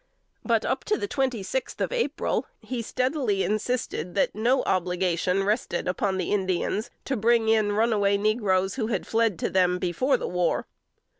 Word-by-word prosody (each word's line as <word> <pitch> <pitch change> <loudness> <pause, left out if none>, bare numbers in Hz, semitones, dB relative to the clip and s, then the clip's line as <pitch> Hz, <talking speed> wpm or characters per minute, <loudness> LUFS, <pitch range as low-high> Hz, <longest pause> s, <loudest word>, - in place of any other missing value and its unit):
But, - - +1
up - - -1
to 425 - +1
the 410 - -3
twenty 260 - -1
sixth 260 +7 -3
of - - -1
April, 470 - -1
he 250 -2 -4
steadily 255 -4 0
insisted 215 -5 -2
that 200 - +2
no 240 +5 +2
obligation 180 +1 0
rested 205 -4 -1
upon 190 +1 0
the 185 - -2
Indians 195 +2 -1 0.2
to 270 - -1
bring 230 0 +3
in 215 -2 +3
runaway 205 -2 +2
negroes 200 -3 +1
who 225 -4 -1
had 210 -5 -2
fled 225 -5 +1
to - - -1
them 180 -1 +3
before 180 - +1
the - - -4
war. 180 -1 0
210 Hz, 165 wpm, -26 LUFS, 185-240 Hz, 0.2 s, bring